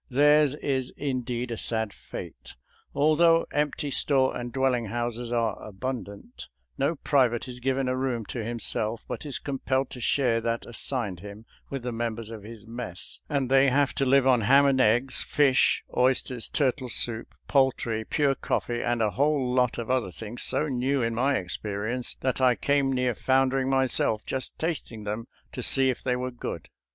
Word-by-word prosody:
Theirs 145 Hz, +1 st, +4 dB
is 130 Hz, -3 st, -1 dB
indeed 125 Hz, -3 st, -2 dB
a 115 Hz, -, -3 dB
sad 110 Hz, -2 st, -1 dB
fate. 60 Hz, -1 st, -9 dB, 0.4 s
Although 165 Hz, +3 st, +4 dB
empty 145 Hz, -1 st, -1 dB
store 135 Hz, -1 st, +2 dB
and 120 Hz, 0 st, -5 dB
dwelling 130 Hz, -2 st, +1 dB
houses 120 Hz, +1 st, -3 dB
are 115 Hz, -3 st, 0 dB
abundant, 105 Hz, 0 st, -6 dB, 0.3 s
no 145 Hz, +5 st, 0 dB
private 130 Hz, -5 st, +1 dB
is 125 Hz, -1 st, -8 dB
given 135 Hz, +1 st, 0 dB
a 130 Hz, -, 0 dB
room 130 Hz, -4 st, -2 dB
to 115 Hz, +2 st, -4 dB
him 120 Hz, +2 st, -3 dB
self, 110 Hz, 0 st, -1 dB
but -, -, -5 dB
is 140 Hz, -, -4 dB
compelled 135 Hz, -1 st, -2 dB
to 125 Hz, -, -7 dB
share 120 Hz, -2 st, +2 dB
that 115 Hz, 0 st, -2 dB
assigned 115 Hz, -5 st, -3 dB
him 100 Hz, +3 st, -10 dB, 0.2 s
with 135 Hz, -3 st, -5 dB
the 125 Hz, -, -2 dB
members 115 Hz, -1 st, -3 dB
of 110 Hz, -2 st, -7 dB
his 110 Hz, +1 st, -11 dB
mess; 115 Hz, -6 st, -7 dB
and 140 Hz, -4 st, 0 dB
they 135 Hz, +1 st, +5 dB
have 140 Hz, +1 st, +2 dB
to 140 Hz, -, 0 dB
live 135 Hz, 0 st, +4 dB
on 125 Hz, -3 st, +4 dB
ham 135 Hz, +6 st, +5 dB
and 135 Hz, -2 st, +3 dB
eggs, 120 Hz, +4 st, +2 dB
fish, 140 Hz, -3 st, +3 dB
oysters, 125 Hz, -1 st, +1 dB
turtle 130 Hz, -2 st, 0 dB
soup, 115 Hz, 0 st, -1 dB
poultry, 125 Hz, -5 st, +1 dB
pure 140 Hz, +4 st, +1 dB
coffee, 120 Hz, -2 st, -2 dB
and 120 Hz, -1 st, 0 dB
a 105 Hz, -, +1 dB
whole 140 Hz, -1 st, +1 dB
lot 125 Hz, -2 st, +2 dB
of 120 Hz, +1 st, -3 dB
other 130 Hz, -7 st, +1 dB
things 110 Hz, +6 st, -8 dB
so 155 Hz, -, 0 dB
new 130 Hz, 0 st, 0 dB
in 115 Hz, 0 st, 0 dB
my 135 Hz, +4 st, +2 dB
experience 105 Hz, +6 st, -3 dB
that 130 Hz, 0 st, -1 dB
I 125 Hz, -1 st, +5 dB
came 140 Hz, 0 st, +1 dB
near 125 Hz, -1 st, +1 dB
foundering 130 Hz, +2 st, +2 dB
myself 130 Hz, -5 st, +1 dB
just 130 Hz, -1 st, -3 dB
tasting 155 Hz, -9 st, -3 dB
them 105 Hz, +3 st, -4 dB, 0.2 s
to 125 Hz, -, -5 dB
see 130 Hz, +1 st, +2 dB
if 125 Hz, -, -7 dB
they 125 Hz, -1 st, 0 dB
were 125 Hz, +1 st, -3 dB
good. 120 Hz, -, -6 dB
125 Hz, 180 wpm, -27 LUFS, 115-135 Hz, 0.4 s, they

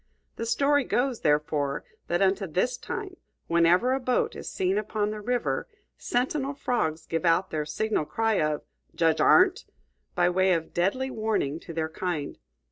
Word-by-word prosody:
The 230 Hz, -, -4 dB
story 285 Hz, +4 st, +3 dB
goes, 250 Hz, -1 st, 0 dB
therefore, 150 Hz, -1 st, 0 dB, 0.2 s
that 175 Hz, +3 st, +1 dB
unto 195 Hz, 0 st, +1 dB
this 185 Hz, +10 st, 0 dB
time 420 Hz, -5 st, -6 dB, 0.3 s
whenever 170 Hz, +9 st, +3 dB
a 265 Hz, -, 0 dB
boat 250 Hz, -1 st, 0 dB
is -, -, -6 dB
seen 190 Hz, +2 st, 0 dB
upon 210 Hz, 0 st, -2 dB
the 215 Hz, 0 st, -6 dB
river, 245 Hz, +3 st, -1 dB, 0.3 s
sentinel 275 Hz, -, -1 dB
frogs 165 Hz, -, -1 dB
give 165 Hz, +1 st, -2 dB
out 175 Hz, +2 st, +2 dB
the 150 Hz, -1 st, -2 dB
signal 215 Hz, 0 st, -1 dB
cry 225 Hz, +4 st, 0 dB
of 150 Hz, -1 st, -1 dB, 0.3 s
"Judge 165 Hz, -1 st, +2 dB
Arndt!" 370 Hz, +1 st, +5 dB, 0.5 s
by 175 Hz, 0 st, +3 dB
way 185 Hz, +1 st, +3 dB
of 165 Hz, -2 st, -3 dB
deadly 255 Hz, +10 st, 0 dB
warning 215 Hz, -, -1 dB
to 170 Hz, -, -10 dB
their 160 Hz, -1 st, -2 dB
kind. 160 Hz, -3 st, -4 dB
190 Hz, 160 wpm, -27 LUFS, 165-245 Hz, 0.5 s, Arndt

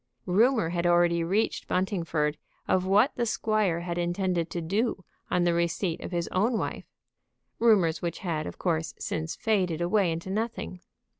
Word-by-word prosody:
Rumor 220 Hz, 0 st, +3 dB
had 175 Hz, 0 st, 0 dB
already 175 Hz, -1 st, +3 dB
reached 195 Hz, +7 st, 0 dB
Buntingford 165 Hz, -6 st, -1 dB, 0.3 s
of 185 Hz, 0 st, +1 dB
what 210 Hz, +8 st, +4 dB
the 240 Hz, -, +1 dB
squire 215 Hz, -6 st, +1 dB
had 175 Hz, 0 st, -3 dB
intended 175 Hz, -1 st, 0 dB
to 175 Hz, -, -3 dB
do 195 Hz, +3 st, -1 dB, 0.2 s
on 180 Hz, -, +2 dB
the 175 Hz, -1 st, +3 dB
receipt 170 Hz, 0 st, -1 dB
of -, -, -5 dB
his 170 Hz, -1 st, -1 dB
own 220 Hz, +6 st, +1 dB
wife, -, -, -4 dB, 0.7 s
rumors 190 Hz, -9 st, +4 dB
which 170 Hz, -1 st, -3 dB
had 155 Hz, -3 st, -1 dB
of -, -, -8 dB
course 165 Hz, -3 st, -1 dB
since 160 Hz, +1 st, -3 dB
faded 185 Hz, -7 st, 0 dB
away 180 Hz, +1 st, +2 dB
into 170 Hz, +3 st, -4 dB
nothing. 215 Hz, -3 st, -3 dB
175 Hz, 160 wpm, -27 LUFS, 170-205 Hz, 0.7 s, what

